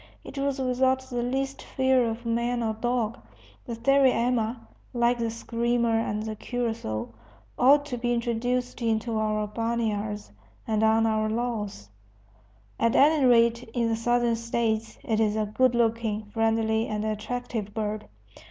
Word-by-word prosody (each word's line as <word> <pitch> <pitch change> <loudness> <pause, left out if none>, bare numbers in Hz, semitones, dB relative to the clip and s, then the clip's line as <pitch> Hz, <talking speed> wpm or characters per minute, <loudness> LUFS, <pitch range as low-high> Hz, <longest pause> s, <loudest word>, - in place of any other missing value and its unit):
It - - -10
was 275 0 0
without 260 0 +1
the 255 -2 -4
least 270 +3 -2
fear 260 -2 +2
of 225 +2 -6
man 235 +1 0
or 220 -1 0
dog. 235 0 -1 0.5
The 235 - -3
sariema 250 -2 +2 0.4
(like 240 0 +2
the 230 -1 0
screamer 235 +1 0
and 210 -1 -2
the 220 0 -4
curassow) 220 - -3 0.5
ought 285 +3 +6
to 250 -4 -4
be 240 0 0
introduced 245 +1 -1
into 225 0 0
our 215 -1 0
barnyards 215 -2 -2 0.3
and 220 -1 0
on 220 +1 +4
our 215 -1 +1
lawns, 215 - -3 0.9
at 230 +2 +2
any 295 +1 +5
rate 235 -1 +4
in 235 -2 +1
the 225 - +1
Southern 240 0 +1
States; 230 -1 -1
it 220 -1 0
is 215 -1 +2
a 215 -1 0
good 245 +4 +2
looking, 225 -2 0
friendly, 225 0 +1
and 215 0 -2
attractive 220 0 -3
bird. 215 -1 -3
230 Hz, 145 wpm, -26 LUFS, 220-245 Hz, 0.9 s, ought